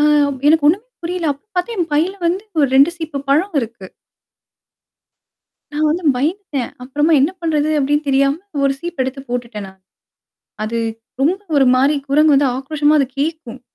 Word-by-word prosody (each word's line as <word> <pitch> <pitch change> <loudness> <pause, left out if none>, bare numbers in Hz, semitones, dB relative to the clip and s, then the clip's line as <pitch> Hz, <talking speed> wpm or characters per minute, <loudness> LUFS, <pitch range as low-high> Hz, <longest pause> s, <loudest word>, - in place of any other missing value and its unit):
அ - - +3 0.5
எனக்கு 310 -1 +4
ஒண்ணுமே 385 +8 +1 0.2
புரியல. 340 -2 -1
அப்ப 280 - -18
பாத்தா 360 +6 -1
என் 345 -3 -1
பைல 320 +6 +2
வந்து, 360 +4 0 0.2
ஒரு 285 -2 +4
2 275 +5 +6
சீப்பு 320 -4 -5
பழ 285 +3 +5 0.2
இருக்கு. 230 -5 -7 1.9
நான் 305 +1 +1
வந்து 340 +3 -1
பயந்துட்டேன். 295 - -2
அப்புறமா 295 +5 0
என்ன 295 - +2
பண்றது 310 -2 0
அப்படின்னு 290 +2 +1
தெரியாம, 275 +1 +3 0.3
ஒரு 275 - +2
சீப் 345 -3 -4
எடுத்து 265 +1 -5
போட்டுட்டேன் 235 -4 -4
நான். 190 0 -16 0.8
அது 230 +2 -2 0.4
ரொம்ப 330 +8 +2 0.2
ஒரு 275 - +5
மாரி, 275 +4 +3
குரங்கு 295 +1 +4
வந்து 275 -1 +3
ஆக்ரோஷமா 295 +2 +1
அது 275 - +2
கேட்கும். 295 -5 -4
290 Hz, 155 wpm, -18 LUFS, 270-320 Hz, 1.9 s, 2